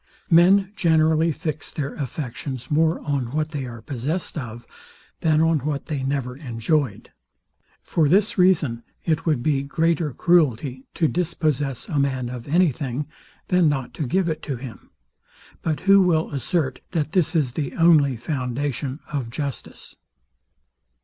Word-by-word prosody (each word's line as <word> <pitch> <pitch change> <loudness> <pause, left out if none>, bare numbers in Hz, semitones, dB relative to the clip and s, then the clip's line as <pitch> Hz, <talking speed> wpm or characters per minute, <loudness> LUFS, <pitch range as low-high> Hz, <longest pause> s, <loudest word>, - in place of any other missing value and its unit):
Men 190 +4 +5
generally 160 -1 +3
fix 155 -1 -4
their 140 -2 -4
affections 130 -1 -5
more 160 +2 +3
on 140 -5 -2
what 155 +3 -1
they 145 -5 -4
are 115 -2 -9
possessed 145 +7 -3
of, 120 -5 -6 0.5
than 155 -1 +3
on 165 -1 +3
what 140 +1 -3
they 150 -4 -3
never 135 -2 -2
enjoyed: 135 +1 -2 0.7
For 155 -4 +1
this 200 +6 +3
reason, 160 - +3 0.2
it 160 0 0
would 145 -7 +1
be 145 -3 +2
greater 160 +2 0
cruelty 135 -5 +1
to 160 - +2
dispossess 150 -6 -1
a 150 - -1
man 130 -3 0
of 125 0 -7
any 170 +2 +4
thing, 135 +2 -4 0.4
than 180 -3 +4
not 135 -4 -2
to 150 - -3
give 185 +7 +1
it 155 -2 -3
him. 130 -4 -7 0.7
But 155 -2 -2
who 195 0 +6
will 165 -3 +2
assert, 140 0 -1
that 155 -3 -1
this 175 -2 +1
is 145 -6 +2
the 140 +2 -4
only 150 -6 +4
foundation 130 +2 -3
of 135 -5 -2
justice? 140 +2 -6
150 Hz, 145 wpm, -23 LUFS, 130-165 Hz, 0.7 s, who